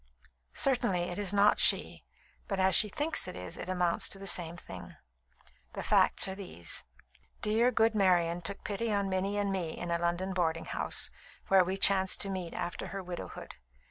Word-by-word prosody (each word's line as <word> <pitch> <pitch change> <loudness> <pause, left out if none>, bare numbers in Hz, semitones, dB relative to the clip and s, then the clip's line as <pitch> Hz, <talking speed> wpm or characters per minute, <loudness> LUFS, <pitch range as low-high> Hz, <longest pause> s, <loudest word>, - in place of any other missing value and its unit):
"Certainly 240 -9 +2
it 175 - -5
is 200 -3 -1
not 205 +1 +4
she; - - +3 0.4
but 195 -2 -3
as 190 0 +3
she 210 - +4
thinks 295 +9 -1
it - - -7
is, 90 0 -7
it - - -7
amounts 180 -2 0
to - - -3
the 195 - -9
same 175 -2 +2
thing. - - -10 0.8
The - - -5
facts - - +3
are 190 - -4
these: 175 - -5 0.6
Dear, 225 +3 +3
good 225 -1 +2
Marian 175 -4 +2
took 195 +3 -7
pity 215 +2 -2
on 200 -1 0
Minnie 195 +2 -1
and 200 -1 0
me 175 -4 -3
in 175 -1 -5
a 170 - 0
London 175 +3 -1
boarding 165 -3 -1
house, - - 0 0.4
where 190 -1 +6
we 185 +2 -3
chanced 190 -1 +5
to 195 - +2
meet 185 -3 -5
after 175 -1 -4
her 195 0 -6
widowhood. 180 -1 -8
190 Hz, 185 wpm, -30 LUFS, 175-200 Hz, 0.8 s, where